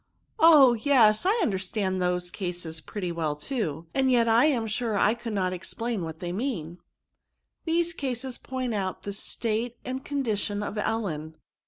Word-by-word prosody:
" - - -45
Oh! 300 - +8
yes; 230 +1 +4
I 435 +4 +3
understand 190 - -1
those 180 0 0
cases 175 -4 -5
pretty 185 -4 -4
well 160 -3 -1
too; 160 - -3
and 265 -1 +2
yet 235 -2 +4
I 230 +4 +5
am 255 -7 +2
sure 220 0 -1
I 210 - +4
could 235 -1 -6
not 185 -2 0
ex 180 - -4
plain 230 -3 -2
what 160 -1 -5
they 175 -1 -3
mean/' 180 - -3 0.4
*' - - -54
These 335 +1 +1
cases 260 -4 -4
point 255 -2 -3
out 190 -3 -3
the 200 - -4
state 230 +3 -2
and 260 +1 -4
con 285 -1 -2
dition 205 -2 -1
of 210 - -4
Ellen. 175 -9 -2
215 Hz, 180 wpm, -27 LUFS, 180-250 Hz, 0.4 s, Oh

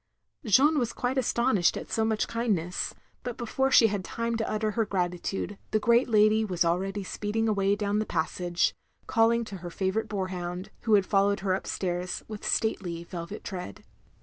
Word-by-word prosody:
Jeanne 285 +7 +5
was 240 -3 -1
quite 255 +2 -1
astonished 235 -6 +2
at - - -7
so 225 - +1
much 220 -1 0
kind 230 -2 +1
ness, 175 +2 -3 0.3
but 245 -2 -5
before 265 +3 0
she 250 - +7
had 205 -3 0
time 230 +3 -2
to 225 -1 -2
utter 215 0 0
her 225 +2 +1
grati 180 -4 -1
tude, 200 +1 -4
the - - +2
great 235 +3 +3
lady 215 0 +4
was 180 -5 0
already 190 +4 0
speeding 210 +4 -2
away 200 -2 +2
down 205 0 0
the 215 - 0
passage, 175 +1 0 0.3
calling 230 0 +3
to 200 - -7
her 175 0 -7
favourite 195 +5 -1
boar 195 -3 -2
hound, 180 +2 -5
who 220 -2 +5
had 200 -2 +3
followed 200 0 +2
her 190 -1 +1
up 190 - -3
stairs 180 -1 -2
with 215 -2 -8
stately 175 -7 -1
velvet 170 +3 -7
tread. 180 - -7
205 Hz, 190 wpm, -28 LUFS, 185-225 Hz, 0.3 s, she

